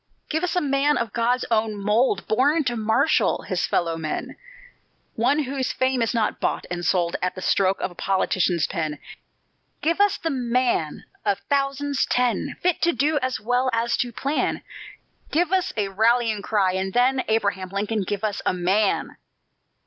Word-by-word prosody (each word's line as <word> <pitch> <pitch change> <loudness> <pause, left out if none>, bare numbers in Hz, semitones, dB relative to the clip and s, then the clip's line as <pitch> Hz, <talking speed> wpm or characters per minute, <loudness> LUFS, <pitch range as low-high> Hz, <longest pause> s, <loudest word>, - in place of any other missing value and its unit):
"Give 315 +2 -1
us 360 - -1
a 360 - +2
man 285 +1 +2
of 230 -3 -3
God's 245 +2 +1
own 215 -1 +1
mould, 210 +1 +1
Born 290 +8 +2
to 240 -3 -1
marshal 220 0 +2
his - - -1
fellow 165 -1 0
men; 155 -2 -4 0.8
One 270 +7 +2
whose 265 -1 -2
fame 260 -1 +1
is 230 - +1
not 225 -3 0
bought - - -1
and 175 0 -3
sold 175 -1 +1
At 180 0 -1
the 185 - -7
stroke 195 0 +2
of - - -2
a - - -12
politician's 180 -2 +1
pen; 155 -5 -3 0.9
Give 335 +5 +2
us 410 -1 +3
the 325 - -2
man 245 - 0 0.2
of 205 -2 +1
thousands 280 0 0
ten, 245 -4 0
Fit 360 -2 +1
to 340 0 +3
do 295 +4 +1
as 255 0 -1
well 245 +3 +1
as 230 +1 +1
to 245 - -1
plan; 275 +6 -1 0.7
Give 345 +4 +1
us 375 0 +1
a 205 -2 0
rallying 220 +1 +2
cry, 200 -3 +1
and 190 0 -2
then, 255 +2 +3
Abraham 200 -4 0
Lincoln, 205 +3 -1
give 200 +2 -3
us 210 -2 -1
a - - +1
MAN! 190 +4 0
230 Hz, 170 wpm, -23 LUFS, 195-270 Hz, 0.9 s, us